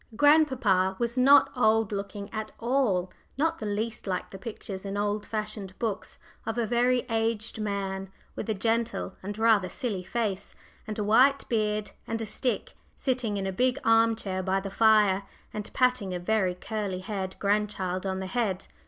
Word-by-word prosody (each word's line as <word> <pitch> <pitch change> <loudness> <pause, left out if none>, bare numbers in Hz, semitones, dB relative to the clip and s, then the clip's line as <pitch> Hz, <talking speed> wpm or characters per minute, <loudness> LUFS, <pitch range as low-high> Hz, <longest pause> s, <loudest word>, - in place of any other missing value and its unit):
Grandpapa 260 -11 +4
was 235 0 -1
not 275 +3 +6
old 225 -2 +3
looking 200 0 -4
at 215 0 -4
all 230 -7 +1 0.3
not 325 +3 +1
the 215 - -4
least 215 +1 -3
like 185 -1 -2
the 195 - -8
pictures 195 -2 -7
in 200 0 -4
old 205 0 -1
fashioned 215 -3 -4
books 220 -4 -3 0.3
of 225 +1 -3
a 235 - +1
very 245 +2 +2
aged 225 -1 -1
man, 195 -2 -3 0.3
with - - -5
a 220 - +1
gentle 225 -1 -1
and 205 +2 -5
rather 220 -4 +4
silly 220 -7 -3
face, 200 -2 -3 0.3
and 215 - -4
a 210 - 0
white 260 +7 +4
beard, 215 -2 0 0.2
and 225 - -2
a 225 - -3
stick, 250 +4 -2 0.2
sitting 250 -6 -1
in 195 - -2
a 190 - -1
big 250 +6 +1
arm 225 0 +4
chair 190 -4 -3
by 190 +1 +1
the 195 0 -6
fire, 210 -3 +4 0.3
and 210 -1 -5
patting 250 -8 +1
a - - -2
very 185 -1 +1
curly 200 -2 -4
haired 190 -1 -4
grandchild 200 -3 0
on 190 -1 -2
the 190 - -4
head. 195 -2 -1
215 Hz, 175 wpm, -28 LUFS, 195-230 Hz, 0.3 s, not